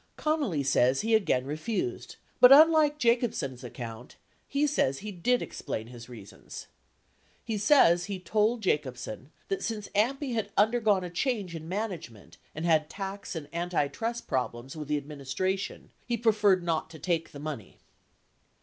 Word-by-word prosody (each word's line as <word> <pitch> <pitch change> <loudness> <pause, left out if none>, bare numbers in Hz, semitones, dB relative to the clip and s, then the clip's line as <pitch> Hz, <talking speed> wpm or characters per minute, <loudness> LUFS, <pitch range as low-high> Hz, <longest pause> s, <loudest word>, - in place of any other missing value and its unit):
Connally 280 - 0
says 130 -1 +3
he 225 +1 0
again 190 -12 +2
refused 215 - -3 0.2
but, 250 - +9
unlike 305 0 +7
Jacobsen's 230 - 0
ac 120 - -8
count, 120 0 -8 0.3
he 280 +2 +1
says 205 - +1
he 210 - -4
did 245 +7 +1
explain 110 - -5
his 120 0 -11
reasons. 105 -5 -10 0.8
He 220 -3 -2
says 175 - +5
he 195 -2 -5
told 215 +5 +1
Jacobsen 130 - -2 0.2
that 195 - -2
since 215 -3 -4
AMPI 255 +5 +1
had 215 -3 -2
undergone 215 -3 +3
a 180 - -6
change 200 -4 -1
in 160 0 -7
management 180 - -5 0.2
and 160 +2 -3
had 155 -2 +3
tax 195 0 -6
and 155 -3 -5
antitrust 175 +7 -2
problems 125 +1 -3
with 150 -2 -6
the 150 0 +1
administration, 150 +7 -4
he 240 -1 -2
preferred 210 -5 +3
not 165 -2 -1
to 160 - -11
take 165 +1 -1
the - - -10
money. 145 -9 -7
185 Hz, 150 wpm, -28 LUFS, 145-225 Hz, 0.8 s, but